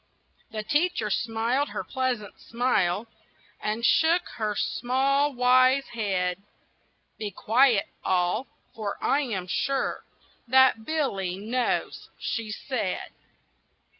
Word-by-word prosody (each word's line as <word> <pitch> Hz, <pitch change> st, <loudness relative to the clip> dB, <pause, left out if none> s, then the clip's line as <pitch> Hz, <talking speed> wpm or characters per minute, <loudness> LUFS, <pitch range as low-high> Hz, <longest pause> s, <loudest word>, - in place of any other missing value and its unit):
The 215 Hz, -2 st, -4 dB
teacher 295 Hz, -, 0 dB
smiled 235 Hz, +6 st, 0 dB
her -, -, -4 dB
pleasant 255 Hz, -6 st, -3 dB
smile, 230 Hz, -5 st, 0 dB, 0.6 s
And 215 Hz, +2 st, -1 dB
shook 335 Hz, +6 st, +3 dB
her 215 Hz, -2 st, -1 dB
small, 275 Hz, +6 st, +1 dB
wise 255 Hz, +1 st, +4 dB
head. 190 Hz, -4 st, -1 dB, 0.8 s
"Be 210 Hz, -, -3 dB
quiet, 225 Hz, +2 st, +3 dB, 0.2 s
all! 185 Hz, +7 st, +1 dB, 0.3 s
for 210 Hz, -3 st, -4 dB
I 280 Hz, -, +2 dB
am 205 Hz, -10 st, -3 dB
sure 275 Hz, +8 st, -1 dB, 0.4 s
That 260 Hz, -3 st, +5 dB
Billy 200 Hz, -, -1 dB
knows!" 235 Hz, +5 st, -2 dB
she 225 Hz, -2 st, -3 dB
said. 215 Hz, -3 st, -3 dB
235 Hz, 105 wpm, -26 LUFS, 210-265 Hz, 0.8 s, That